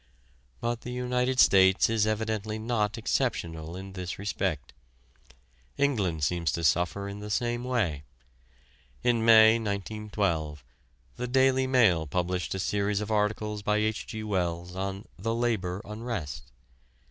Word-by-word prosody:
But 120 0 -2
the 125 - -7
United 125 +1 -1
States 95 -3 +6
is 110 -2 +1
evidently 110 0 -2
not 110 -1 -1
exceptional 85 -9 -2
in 95 +1 -8
this 90 -2 -5
respect. 100 0 -3 1.0
England 100 - 0
seems 85 +1 +1
to 85 - -3
suffer 90 +6 +1
in 100 +1 -7
the 105 0 -7
same 120 +3 -1
way. 110 - -1 1.0
In 120 -2 +2
May, 110 0 +7
1912, 100 - -2 0.5
the 125 - -3
"Daily 130 +1 +3
Mail" 100 - +3
published 90 +4 -2
a - - -3
series 100 +1 0
of 105 0 -4
articles 105 0 0
by 105 +1 +1
H. 110 0 -1
G. 110 -1 -5
Wells 90 -3 -2
on 95 +2 -4
"The 115 +4 -1
Labour 105 -5 -1
Unrest." 90 - -5
105 Hz, 135 wpm, -28 LUFS, 90-115 Hz, 1.0 s, May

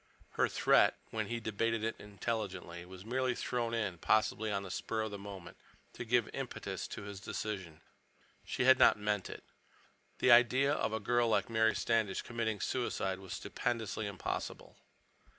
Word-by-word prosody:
Her - - +2
threat, - - +4
when - - -2
he 120 0 -2
debated 110 0 -1
it 115 0 -1
intelligently, 100 -4 -4
was 95 +1 -11
merely 130 +1 0
thrown 120 -2 -1
in, 100 -7 -2
possibly 110 +1 +2
on 100 -1 -1
the 95 - -7
spur 110 +3 -2
of 110 - -4
the 100 - -6
moment, 100 -3 -9 0.4
to - - -6
give 120 -1 +2
impetus - - -4
to - - -7
his 100 -1 -7
decision. 95 -6 -5 0.6
She - - -2
had 130 0 +7
not - - +7
meant 105 -2 -1
it. - - -8 0.7
The 130 - +4
idea 125 +4 +6
of 110 -7 0
a 110 - -1
girl 120 +2 +2
like 115 - +1
Mary 110 0 +3
Standish 110 -4 +1
committing 115 -3 -2
suicide 95 -6 -1
was 95 -1 -8
stupendously 110 +1 -2
impossible. 100 -2 -5
110 Hz, 165 wpm, -34 LUFS, 100-115 Hz, 0.7 s, had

